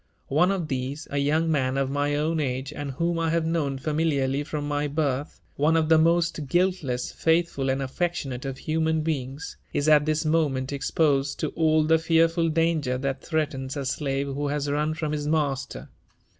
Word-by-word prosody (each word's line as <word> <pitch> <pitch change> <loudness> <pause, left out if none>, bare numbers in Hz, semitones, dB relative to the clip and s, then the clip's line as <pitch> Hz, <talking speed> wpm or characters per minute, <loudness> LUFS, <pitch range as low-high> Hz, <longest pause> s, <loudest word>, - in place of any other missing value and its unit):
One 155 +7 +3
of 190 -5 -1
these, 135 +2 -4
a 140 - 0
young 155 +3 +1
man 135 -3 +1
of 135 -1 0
my 145 +1 0
own 155 +2 0
age, 135 0 -2
and 145 -1 -5
whom 170 +4 -1
I 165 -1 +1
have 165 0 +1
known 155 -5 -1
familiarly 145 -2 0
from 145 -1 -4
my 145 0 -1
birth, 145 -1 -2
— - - -37
one 155 +3 +3
of 160 -1 +1
the 160 -1 +6
most 165 -2 +2
guiltless, 175 -7 0
faithful, 160 -5 +1
and 135 +1 0
affectionate 135 -2 -3
of 135 -1 -4
human 160 +1 0
beings, 140 -2 -4
— - - -36
is 145 - 0
at 150 -1 +5
this 155 +1 0
moment 145 -4 +1
exposed 140 0 +1
to - - 0
all 155 -1 +2
the 160 +1 +3
fearful 165 +1 +2
danger 160 -5 +1
that 135 0 -3
threatens 145 -4 -2
a 140 - -3
slave 135 0 -1
who 140 +1 -3
has 145 0 -1
run 150 +2 0
from 155 -2 -3
his 150 -1 -2
master. 140 -4 -1
150 Hz, 190 wpm, -25 LUFS, 135-160 Hz, -, the